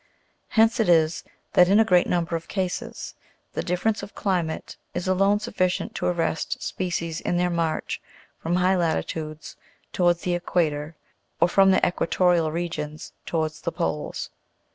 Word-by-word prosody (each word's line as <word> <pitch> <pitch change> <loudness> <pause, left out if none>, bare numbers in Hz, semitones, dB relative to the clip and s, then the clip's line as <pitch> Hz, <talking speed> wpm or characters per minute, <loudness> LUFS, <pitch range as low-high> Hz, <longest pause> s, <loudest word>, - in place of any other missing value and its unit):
Hence 225 +1 +3
it 220 - +2
is 160 -1 +3 0.3
that, 180 0 +6
in 200 +2 +6
a 225 - +5
great 180 -4 +4
number 170 -1 0
of 165 0 -5
cases, 185 -3 -3 0.4
the - - -1
dif 180 +1 -2
ference 220 -1 +1
of 200 +1 -9
climate 175 -5 -2 0.2
is 175 - -2
alone 195 +2 +3
sufficient 195 -5 -1
to - - -2
arrest 165 -2 -1
species 170 -2 -3
in 175 - 0
their 180 0 +1
march 165 -2 -1 0.4
from 165 +2 -1
high 180 +1 +3
latitudes 160 -3 -2 0.4
towards 175 -1 +2
the 180 - -1
equator, 160 -3 -1 0.4
or - - +5
from 195 +2 +5
the 190 - +5
equa 175 - +1
torial 175 -4 +3
regions 155 -2 -4
towards 155 -2 -2
the 170 - -2
poles. 165 -3 -3
175 Hz, 160 wpm, -25 LUFS, 165-185 Hz, 0.4 s, that